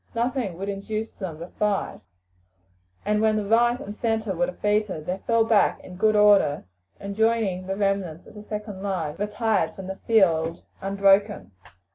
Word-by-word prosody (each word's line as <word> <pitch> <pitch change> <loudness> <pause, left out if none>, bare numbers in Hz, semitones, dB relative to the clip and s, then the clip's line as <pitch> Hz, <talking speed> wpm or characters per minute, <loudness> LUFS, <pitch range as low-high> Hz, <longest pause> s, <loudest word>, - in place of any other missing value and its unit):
Nothing 235 -6 -1
would 195 +2 -5
induce 215 +2 -4
them 180 -6 -6
to 170 +2 -8
fight, 205 +1 -2 1.0
and 210 +1 +1
when 220 -1 +3
the 210 -1 -1
right 240 +3 +3
and 205 - -7
centre 220 -2 -1
were 260 - +1
defeated 210 - -1
they 185 +3 -3
fell 230 -1 +4
back 220 -2 +3
in 180 - -10
good 215 +3 +2
order, 205 - +4 0.3
and, 200 0 -6
joining 220 -5 +1
the 195 - -2
remnants 195 -5 -1
of - - -15
the 210 - -10
second 210 -2 -6
line, 185 -7 -2
retired 210 -4 0
from 190 - -8
the 190 +1 -6
field 170 -7 +2 0.2
unbroken. 195 - +2
205 Hz, 165 wpm, -25 LUFS, 190-220 Hz, 1.0 s, fell